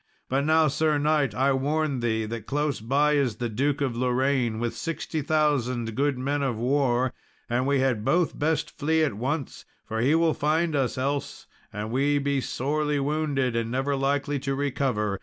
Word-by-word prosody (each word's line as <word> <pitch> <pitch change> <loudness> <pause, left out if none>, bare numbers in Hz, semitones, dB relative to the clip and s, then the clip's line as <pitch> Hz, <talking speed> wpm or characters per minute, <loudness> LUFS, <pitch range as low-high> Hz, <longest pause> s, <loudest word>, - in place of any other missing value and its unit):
But 135 +2 +1
now, 160 0 +4
Sir 155 +1 +1
knight, 145 -3 +1
I 135 +2 +2
warn 145 +1 0
thee 110 -2 0
that 110 -1 -6
close 145 0 -1
by 140 +6 +2
is 140 -6 +1
the 120 -1 -3
Duke 140 +6 0
of 130 -4 0
Lorraine, 125 -1 +1
with 120 0 -2
sixty 165 -1 -3
thousand 135 -7 0
good 140 0 +1
men 140 +3 -1
of 130 -5 -1
war; 130 0 +1 0.3
and 125 +2 0
we 140 -1 +2
had 125 -5 +1
both 170 +6 +1
best 160 +1 0
flee 160 +2 +2
at 150 - 0
once, 135 +6 -3 0.2
for 110 0 -3
he 140 +6 +3
will 165 -1 +3
find 160 +2 0
us 135 -3 0
else, 140 +2 -3 0.3
and 105 +2 -5
we 140 +3 +2
be 140 -1 0
sorely 145 +3 -1
wounded 140 -3 0
and 115 -1 -1
never 135 +3 0
likely 140 +1 0
to 135 0 -2
recover. 125 -8 -1
140 Hz, 180 wpm, -26 LUFS, 125-145 Hz, 0.3 s, now